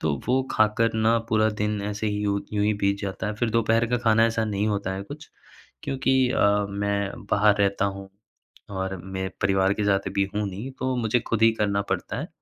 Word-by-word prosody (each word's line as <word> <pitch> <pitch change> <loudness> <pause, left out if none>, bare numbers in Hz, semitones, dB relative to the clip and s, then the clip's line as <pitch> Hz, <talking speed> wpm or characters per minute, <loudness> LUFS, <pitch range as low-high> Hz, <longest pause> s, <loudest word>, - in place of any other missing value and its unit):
तो 75 -2 0
वो 130 +1 +3
खाकर 110 +1 +2
ना 110 +1 +3
पूरा 110 0 +3
दिन 105 -1 -1
ऐसे 105 +1 -3
ही 105 0 -1
यूँ 100 0 0
यूँ 105 -1 +1
ही 105 0 +2
बीत 100 0 +2
जाता 100 +1 -4
है, 105 - -2
फिर 115 +1 -1
दोपहर 115 +1 +2
का 125 - +2
खाना 115 0 +5
ऐसा 115 -1 0
नहीं 105 -1 -1
होता 100 -2 -1
है 95 - -5
कुछ, 145 +9 -10 0.6
क्योंकि 135 0 +1
अ, 100 -2 +2
मैं 100 0 -1 0.2
बाहर 105 0 +4
रहता 100 -1 +1
हूँ 100 0 -9 0.6
और 95 -1 -3
मैं 95 0 -4
परिवार 95 0 +2
के 105 - -2
साथ 100 -1 +1
अभी 100 0 0
हूँ 105 0 0
नहीं, 110 +8 -6
तो 130 0 -2
मुझे 120 0 +1
खुद 115 -1 -3
ही 115 0 +6
करना 100 -1 +1
पड़ता - - -4
है। - - -5
105 Hz, 215 wpm, -25 LUFS, 100-115 Hz, 0.6 s, ही